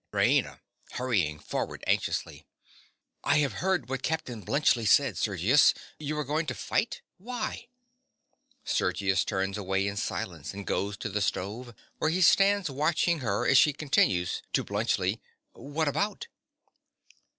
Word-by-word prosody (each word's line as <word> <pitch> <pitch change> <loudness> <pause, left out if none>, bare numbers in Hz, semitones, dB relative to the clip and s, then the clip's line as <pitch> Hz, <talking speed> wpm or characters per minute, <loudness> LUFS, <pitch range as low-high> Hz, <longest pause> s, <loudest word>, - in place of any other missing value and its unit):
RAINA. - - +1 0.3
(hurrying 100 -12 0
forward - - -4
anxiously). - - -1 0.8
I 145 - +3
have 145 -2 +1
heard 185 -7 0
what 135 0 -3
Captain 130 -10 -3
Bluntschli 120 - +2
said, 130 -3 +4
Sergius. 105 - +3 0.2
You 150 0 -3
are 150 - 0
going 155 +3 -1
to 130 - -3
fight. - - -2 0.2
Why? 235 +2 -5 1.0
(Sergius 95 +1 +1
turns 95 +1 -2
away 95 0 0
in 100 0 -4
silence, 95 -6 -4
and 100 0 -7
goes 100 +2 -2
to - - -4
the 105 +1 -2
stove, 110 +5 -3 0.2
where 155 - +1
he 180 +3 0
stands 195 +2 +5
watching 155 +4 +1
her 105 -6 -1
as - - +6
she 150 - +4
continues, 95 - +1
to - - +2
Bluntschli) - - 0 0.3
What 145 +3 -3
about? 205 - -1
130 Hz, 140 wpm, -28 LUFS, 100-155 Hz, 1.0 s, as